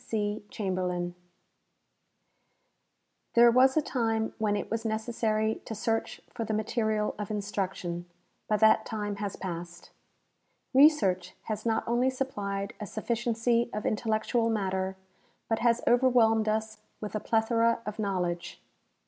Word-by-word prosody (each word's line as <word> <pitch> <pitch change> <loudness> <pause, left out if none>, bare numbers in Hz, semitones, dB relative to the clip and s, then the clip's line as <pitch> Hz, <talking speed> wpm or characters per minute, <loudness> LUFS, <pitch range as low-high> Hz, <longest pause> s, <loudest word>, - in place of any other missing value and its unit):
C. 210 -2 -2
CHAMBERLIN 180 -3 -2 2.2
There 235 0 +8
was 260 +4 +5
a 310 - +3
time 225 -5 -1
when 210 -2 +1
it 205 - -4
was 225 0 -1
necessary 220 -1 -1
to 220 - -5
search 225 +1 -2
for 230 - -3
the 220 -1 -2
material 215 -1 0
of 210 - -4
instruction, 190 -4 -3 0.4
but 215 0 +1
tliat 220 0 +6
time 205 -2 -4
has 205 -1 -3
passed. 175 -1 -7 0.8
Researcli 265 - +4
has 215 +1 -4
not 225 - 0
only 240 +2 +2
supplied 205 -6 -3
a 210 - -5
sufficiency 235 +2 0
of 210 - -3
intellectual 225 +1 0
matter, 190 -3 -1 0.5
but 225 - 0
has 235 0 +2
overwhelmed 235 -3 +4
us 220 0 -2 0.2
with 210 - -6
a 215 - -1
plethora 230 +1 +1
of 210 +1 -5
knowledge. 180 -4 -2
220 Hz, 130 wpm, -29 LUFS, 200-230 Hz, 2.2 s, There